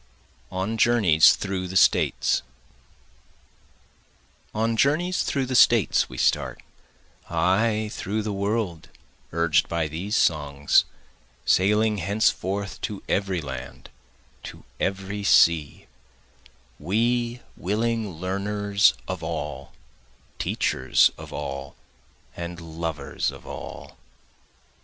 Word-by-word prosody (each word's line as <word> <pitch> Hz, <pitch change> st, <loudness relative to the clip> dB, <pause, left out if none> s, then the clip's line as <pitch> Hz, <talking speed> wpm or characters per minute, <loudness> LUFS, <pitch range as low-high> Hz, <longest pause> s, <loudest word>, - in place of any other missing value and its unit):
On 100 Hz, +5 st, -3 dB
Journeys 105 Hz, -11 st, +5 dB
Through 95 Hz, -2 st, -3 dB
the 95 Hz, +1 st, -1 dB
States -, -, +3 dB, 2.1 s
On 115 Hz, +1 st, 0 dB
journeys 160 Hz, +9 st, +2 dB
through 135 Hz, -2 st, -1 dB
the 130 Hz, -, -4 dB
States 120 Hz, -3 st, +4 dB
we 65 Hz, -, -9 dB
start, -, -, 0 dB, 0.7 s
(Ay 110 Hz, +3 st, +1 dB
through 105 Hz, +3 st, -3 dB
the 105 Hz, -1 st, -3 dB
world, 100 Hz, -5 st, -2 dB, 0.4 s
urged 85 Hz, 0 st, +2 dB
by 85 Hz, -2 st, -1 dB
these 90 Hz, +9 st, -3 dB
songs, 70 Hz, -3 st, +2 dB, 0.6 s
Sailing 105 Hz, +2 st, +3 dB
henceforth 100 Hz, 0 st, -1 dB
to 105 Hz, -2 st, -5 dB
every 95 Hz, -3 st, 0 dB
land, 65 Hz, -3 st, -8 dB, 0.5 s
to -, -, -10 dB, 0.2 s
every 95 Hz, +1 st, -2 dB
sea,) 80 Hz, -6 st, +3 dB, 0.9 s
We 120 Hz, +7 st, 0 dB
willing 110 Hz, +3 st, -1 dB
learners 100 Hz, +4 st, +1 dB
of -, -, -4 dB
all, -, -, -5 dB, 0.7 s
teachers 65 Hz, 0 st, +2 dB
of -, -, -11 dB
all, 70 Hz, 0 st, -6 dB, 0.6 s
and 85 Hz, 0 st, -6 dB
lovers 80 Hz, -2 st, -3 dB
of -, -, -11 dB
all. -, -, -9 dB
100 Hz, 95 wpm, -24 LUFS, 85-110 Hz, 2.1 s, Journeys